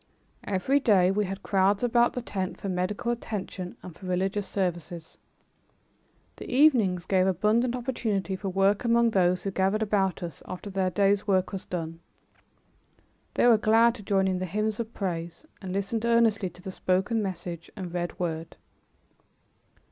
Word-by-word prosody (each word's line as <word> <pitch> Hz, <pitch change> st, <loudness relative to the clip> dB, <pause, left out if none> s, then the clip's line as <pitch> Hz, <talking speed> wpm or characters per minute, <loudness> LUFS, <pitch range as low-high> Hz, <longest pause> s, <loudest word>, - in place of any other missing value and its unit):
Every 205 Hz, +9 st, +2 dB
day 190 Hz, -8 st, +4 dB
we 210 Hz, +1 st, +1 dB
had 195 Hz, +1 st, -6 dB
crowds 195 Hz, +2 st, +2 dB
about 240 Hz, 0 st, +3 dB
the 250 Hz, -, -4 dB
tent 190 Hz, -4 st, -4 dB
for -, -, -5 dB
medical 185 Hz, +6 st, -1 dB
attention 195 Hz, -5 st, -5 dB
and 180 Hz, -3 st, -9 dB
for 185 Hz, -, -10 dB
religious 190 Hz, +2 st, -1 dB
services. 175 Hz, -3 st, -4 dB, 1.2 s
The -, -, -8 dB
evenings 240 Hz, -, +4 dB
gave 185 Hz, -1 st, +2 dB
abundant 215 Hz, +7 st, +2 dB
opportunity 220 Hz, -6 st, -2 dB
for 190 Hz, +1 st, -4 dB
work 195 Hz, +3 st, +2 dB
among 235 Hz, -1 st, +3 dB
those 180 Hz, -2 st, +2 dB
who 195 Hz, -, -2 dB
gathered 195 Hz, +3 st, +1 dB
about 195 Hz, -3 st, 0 dB
us 170 Hz, -5 st, -7 dB
after 185 Hz, +2 st, -7 dB
their 190 Hz, -1 st, 0 dB
day's 200 Hz, +2 st, +2 dB
work 190 Hz, -2 st, +2 dB
was 195 Hz, -2 st, -6 dB
done. 165 Hz, -2 st, -4 dB, 1.4 s
They -, -, +3 dB
were 235 Hz, -3 st, +6 dB
glad 225 Hz, +2 st, +4 dB
to 240 Hz, -, -10 dB
join 195 Hz, -1 st, +1 dB
in 185 Hz, -1 st, 0 dB
the 185 Hz, -, -2 dB
hymns 215 Hz, +4 st, -1 dB
of 230 Hz, -1 st, -4 dB
praise, 170 Hz, -, -4 dB, 0.2 s
and 190 Hz, -2 st, -6 dB
listened 200 Hz, +4 st, -2 dB
earnestly 230 Hz, -4 st, +3 dB
to 180 Hz, +1 st, -17 dB
the 190 Hz, -, -5 dB
spoken 190 Hz, +5 st, 0 dB
message 175 Hz, -3 st, -5 dB
and 185 Hz, -4 st, -6 dB
read 175 Hz, 0 st, -3 dB
word. 165 Hz, -3 st, -4 dB
195 Hz, 165 wpm, -27 LUFS, 185-215 Hz, 1.4 s, were